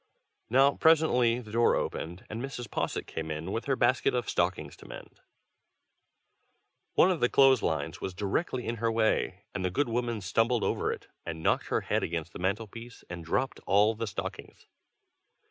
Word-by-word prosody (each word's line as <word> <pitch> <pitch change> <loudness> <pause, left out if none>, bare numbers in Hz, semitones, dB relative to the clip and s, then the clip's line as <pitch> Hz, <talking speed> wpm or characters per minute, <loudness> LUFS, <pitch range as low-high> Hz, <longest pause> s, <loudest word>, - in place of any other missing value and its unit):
Now 135 +4 +5
presently 125 -7 +4
the 110 -3 -12
door 115 +1 +3
opened, 85 +4 -4
and 110 +2 -5
Mrs. 125 -3 -6
Posset - - -2
came 80 0 -5
in, 80 +4 -4
with 115 - -3
her 135 - +1
basket 130 0 +2
of 120 -2 -1
stockings 85 -5 -1
to - - -14
mend. - - -11 1.8
One 185 - +6
of 175 - -1
the 120 - +3
clothes 135 -3 +5
lines 80 -1 -2
was 95 - -4
directly 120 - -2
in 115 +1 -2
her 115 0 0
way, 110 -1 0
and 95 - -3
the 90 - +1
good 140 +8 0
woman 120 -2 -1
stumbled 115 +5 +1
over - - 0
it, - - -7 0.2
and 80 -1 -6
knocked - - +1
her - - 0
head - - 0
against 85 0 -3
the - - -8
mantel 100 +5 0
piece 115 +3 -11
and 85 -1 -6
dropped 130 +11 -1
all 105 +3 +4
the 115 +1 -4
stockings. 100 - -7
115 Hz, 180 wpm, -29 LUFS, 90-125 Hz, 1.8 s, One